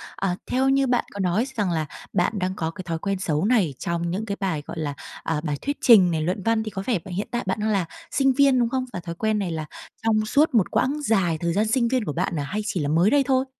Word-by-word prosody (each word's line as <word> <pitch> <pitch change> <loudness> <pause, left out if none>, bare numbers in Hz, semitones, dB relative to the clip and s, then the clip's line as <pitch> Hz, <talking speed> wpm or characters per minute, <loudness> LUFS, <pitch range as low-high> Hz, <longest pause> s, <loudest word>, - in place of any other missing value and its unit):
Ờ, 185 -2 -1
theo 265 +1 +1
như 270 0 +3
bạn 245 -1 +1
có 200 - -7
nói 190 +6 +1
rằng 205 -5 0
là 160 -2 0 0.3
bạn 175 - +1
đang 185 +1 -1
có 160 -2 -2
cái 185 - -8
thói 165 -2 -3
quen 195 +2 -2
xấu 160 -1 0
này 210 - +2
trong 170 0 -2
những 200 +5 -2
cái 200 -2 -4
bài, 180 -7 -1
gọi 165 - -7
là, 145 -2 -2 0.3
à, 160 -2 -1
bài 145 -3 -2
thuyết 285 +1 -2
trình 195 -8 +7
này, 160 -1 0
luận 180 +4 -2
văn 225 -1 +1
thì 215 - -5
có 190 -2 -4
vẻ 230 -6 +1
b 190 - -15
hiện 190 +3 -3
tại 240 -3 -1
bạn 190 +3 -1
đang 215 - 0
là 195 -4 +1 0.3
sinh 270 -1 +3
viên, 275 -1 +4
đúng 235 - +2
không? 260 +1 -1
Và - - -3
thói 170 -1 -6
quen 215 +2 0
này 185 -4 -2
là 155 -1 -3 0.4
trong 215 -1 +2
suốt 290 +5 +3
một 215 -6 +3
quãng 285 +3 +1
dài 190 - +1
thời 170 +1 -1
gian 210 +3 +1
sinh 235 +1 +2
viên 250 -2 0
của 150 - -3
bạn 170 -1 -1
à, 145 - -1
hay 205 +9 -3
chỉ 185 - -2
là 145 - -1
mới 170 +7 +4
đây 285 -1 +4
thôi? 265 0 +2
195 Hz, 285 wpm, -24 LUFS, 170-235 Hz, 0.4 s, trình